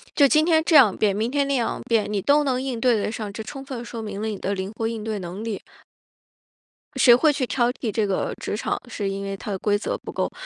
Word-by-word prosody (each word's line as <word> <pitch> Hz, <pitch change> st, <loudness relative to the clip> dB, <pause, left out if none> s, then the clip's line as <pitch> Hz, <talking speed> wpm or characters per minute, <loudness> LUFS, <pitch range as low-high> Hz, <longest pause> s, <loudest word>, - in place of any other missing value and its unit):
就 285 Hz, -, +6 dB
今 305 Hz, +3 st, +4 dB
天 320 Hz, -1 st, +3 dB
这 330 Hz, -, +3 dB
样 240 Hz, -10 st, +7 dB
变， 205 Hz, -3 st, +2 dB
明 220 Hz, +3 st, -1 dB
天 280 Hz, +1 st, 0 dB
那 280 Hz, -, 0 dB
样 240 Hz, -4 st, -1 dB
变， 220 Hz, -3 st, +1 dB
你 205 Hz, -, 0 dB
都 285 Hz, +8 st, +3 dB
能 260 Hz, -3 st, 0 dB
应 255 Hz, -3 st, -4 dB
对 245 Hz, -2 st, +4 dB
得 210 Hz, -, -2 dB
上， 215 Hz, -3 st, -5 dB
这 220 Hz, +2 st, -6 dB
充 270 Hz, +4 st, -8 dB
分 255 Hz, -4 st, -6 dB
说 225 Hz, +1 st, -6 dB
明 205 Hz, -2 st, -6 dB
了 220 Hz, -, -2 dB
你 210 Hz, -3 st, -4 dB
的 200 Hz, -, -2 dB
灵 190 Hz, +1 st, -4 dB
活 225 Hz, 0 st, -1 dB
应 225 Hz, -2 st, -4 dB
对 215 Hz, -1 st, -3 dB
能 185 Hz, +3 st, -6 dB
力。 225 Hz, -4 st, -4 dB, 1.3 s
谁 245 Hz, -, +7 dB
会 300 Hz, +6 st, +5 dB
去 275 Hz, -3 st, -1 dB
挑 245 Hz, -1 st, +1 dB
剔 225 Hz, -, -4 dB
这 210 Hz, 0 st, 0 dB
个 195 Hz, -, -1 dB
职 -, -, -3 dB
场， 215 Hz, -, -2 dB
是 205 Hz, -4 st, -3 dB
因 195 Hz, 0 st, -4 dB
为 195 Hz, 0 st, -4 dB
它 210 Hz, -, -6 dB
的 190 Hz, -, -3 dB
规 205 Hz, -1 st, +1 dB
则 205 Hz, -, -3 dB
不 -, -, -9 dB
够， -, -, -2 dB
225 Hz, 285 characters per minute, -23 LUFS, 205-260 Hz, 1.3 s, 样